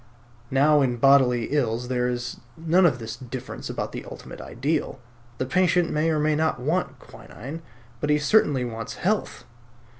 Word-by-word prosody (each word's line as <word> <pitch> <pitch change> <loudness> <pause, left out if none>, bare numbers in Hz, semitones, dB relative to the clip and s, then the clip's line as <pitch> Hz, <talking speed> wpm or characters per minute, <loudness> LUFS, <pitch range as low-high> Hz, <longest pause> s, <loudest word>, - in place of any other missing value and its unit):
Now 145 +2 +4
in 125 -3 +1
bodily 125 -3 +4
ills 125 -4 0
there 125 -1 0
is 120 0 -4 0.2
none 170 +3 +4
of 140 - 0
this 115 -1 -6
difference 130 0 -7
about - - -3
the - - -6
ultimate - - -10
ideal. 140 +2 -2 0.4
The 130 - -1
patient 175 +3 +2
may 155 +2 +1
or 155 - +1
may 150 +1 +2
not 160 -3 0
want 160 +8 -1
quinine; 140 +9 -10 0.4
but 150 - -2
he 150 - +4
certainly 145 - +3
wants 115 -1 -6
health. 210 +3 -1
140 Hz, 160 wpm, -25 LUFS, 125-160 Hz, 0.4 s, Now